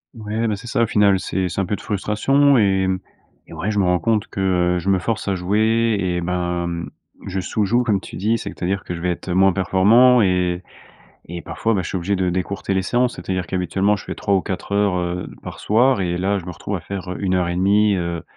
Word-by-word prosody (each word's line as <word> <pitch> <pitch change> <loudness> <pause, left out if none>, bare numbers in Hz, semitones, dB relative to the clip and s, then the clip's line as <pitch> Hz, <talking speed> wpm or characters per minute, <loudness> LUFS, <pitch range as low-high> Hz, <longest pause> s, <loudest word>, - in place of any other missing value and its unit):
Ouais, 110 +1 -2
bah, 105 - 0
c'est 115 +4 -11
ça 115 - 0
au - - +1
final. 100 -3 +3
C'est 95 -1 -2
c'est 90 +4 -2
un - - -1
peu 105 - -1
de - - -11
frustration 135 +8 +2
et 95 -3 +2
mmh 95 0 0 0.5
et - - -12
ouais 105 +3 -2
je 105 - 0
me 95 - +3
rends 90 0 +3
compte 110 +1 0
que, 90 -2 +1
heu, - - 0
je 95 +3 -3
me 95 - +2
force 110 +2 -3
à 100 - +1
jouer 110 +4 +1
et 90 -2 -1
ben, 90 0 -2
mmh, 85 0 -4 0.4
je 95 0 -2
sous 100 +3 -1
joue 120 +5 +2
comme 105 -5 +1
tu - - -10
dis. 110 +5 +1
C'est-à-dire 95 -1 -3
que 90 - -5
je 85 - -7
vais 90 - 0
être, 90 - -6
heu, - - 0
moins 95 0 +4
performant 110 +7 +5
et 90 -2 +1 0.6
et 85 +1 -7
parfois, 115 0 -1
bah, 95 - 0
je - - -5
suis 95 - -2
obligé 95 +3 -1
de 90 -1 0
d'écourter 95 +2 -2
les 95 - +1
séances. 120 +5 0
C'est-à-dire 95 -1 -3
qu'habituellement 95 +2 0
je 95 - -9
fais - - -5
3 100 - -1
ou 95 - +2
4 95 +1 -5
heures, 100 -3 +2
heu, 90 0 -3
par - - -8
soir 115 0 +3
et 90 -1 -1
là 100 +2 0
je 85 - -11
me 90 - -5
retrouve - - -5
à - - -5
faire, 95 -2 -6
heu, - - -5
1 95 -1 +1
heure 90 -1 +1
et 85 - -2
demie, 100 +2 +3
heu 85 -2 -3
95 Hz, 260 wpm, -21 LUFS, 90-105 Hz, 0.6 s, performant